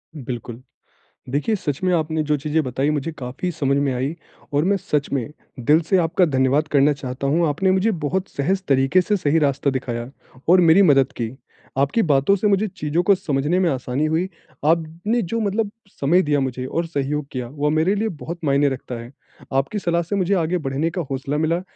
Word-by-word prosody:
बिल्कुल। 120 -3 -6 0.7
देखिए, 145 - 0
सच 145 -6 -4
में 185 - +2
आपने 160 -1 0
जो 150 0 +1
चीज़ें 155 +2 0
बताई, 135 +3 0
मुझे 150 +2 -2
काफ़ी 130 +7 -4
समझ 140 -4 0
में 140 -1 +1
आईं 130 +5 -2 0.4
और 145 +2 +2
मैं 200 +2 +2
सच 150 -6 -1
में 135 0 -1 0.3
दिल 150 +6 +5
से 190 - +4
आपका 170 +2 +2
धन्यवाद 140 +1 +2
करना 145 +1 +4
चाहता 135 -1 -5
हूँ। 165 +5 +2
आपने 190 +6 +1
मुझे 190 +4 +2
बहुत 185 +6 -1
सहज 190 +7 -1
तरीके 135 +6 +4
से 205 +3 +1
सही 160 -4 +2
रास्ता 140 -2 +1
दिखाया 125 -2 -4 0.4
और 180 +1 +7
मेरी 170 +3 +6
मदद 140 -5 +4
की। 115 -2 -2 0.5
आपकी 140 +12 +2
बातों 150 +4 +3
से 205 - -1
मुझे 200 +2 +2
चीजों 155 0 0
को 200 +3 +5
समझने 150 0 0
में 180 - +3
आसानी 130 +2 -1
हुई। 160 +4 0 0.4
आपने 165 +8 +1
जो 230 +6 -2
मतलब 210 0 0 0.3
समय 170 +7 +4
दिया 145 -3 +1
मुझे 130 -1 -3
और 165 +5 -2
सहयोग 150 -1 -2
किया, 125 -2 -4
वो 145 +2 -1
मेरे 160 +6 +2
लिए 215 +2 0
बहुत 170 -1 -7
मायने 140 0 +3
रखता 130 -2 -5
है। 120 +3 -10 0.4
आपकी 135 +10 0
सलाह 170 -3 0
से 185 +5 -3
मुझे 195 0 +1
आगे 175 0 +1
बढ़ने 145 +2 -1
का 180 +2 -4
हौसला 135 +2 -2
मिला, 165 +3 +1
150 Hz, 200 wpm, -22 LUFS, 135-180 Hz, 0.7 s, और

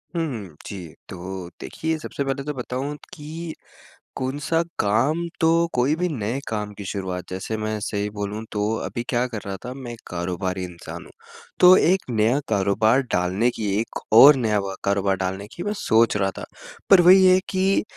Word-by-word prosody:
हुँ, 115 - -3
जी। 95 -4 -7 0.2
तो 95 0 -7
देखिए, 160 0 -3
सबसे 140 - -4
पहले 135 0 -2
तो 150 +1 -3
बताऊँ 130 +3 -4 0.2
कि 160 +2 -7 0.6
कौन-सा 145 +5 -1 0.2
काम 115 +11 +2 0.2
तो 160 - +3 0.3
कोई 130 +5 +2
भी 180 +2 0
नए 120 -2 -2
काम 105 -1 -3
की 100 - -7
शुरुआत, 95 -2 -4
जैसे 95 +4 -4
मैं 110 0 -2
सही 105 0 -2
बोलूँ 105 +1 -5
तो 105 - -2 0.2
अभी 110 +5 -4
क्या 120 0 +1
कर 115 -3 -5
रहा 100 -1 -4
था 125 - -5
मैं 130 -3 -8
एक 115 - -9
कारोबारी 90 +1 -3
इंसान 90 -1 -8
हूँ। - - -15 0.5
तो 180 +1 +9
एक 185 +3 +3
नया 115 +4 +2
कारोबार 110 +5 +3
डालने 95 +7 +1
की 105 -2 -2
एक 115 - -4
और 140 +5 +10
नया 110 -5 +1
व 100 -1 -4
कारोबार 100 -1 +1
डालने 95 +2 -3
की 175 - -5
मैं 205 - -1
सोच 115 - +3
रहा 95 -1 +1
था। - - -6 0.4
पर 190 -3 +8
वही 185 +2 +7
है 185 0 +6
कि 190 +1 +2
110 Hz, 180 wpm, -23 LUFS, 100-145 Hz, 0.6 s, और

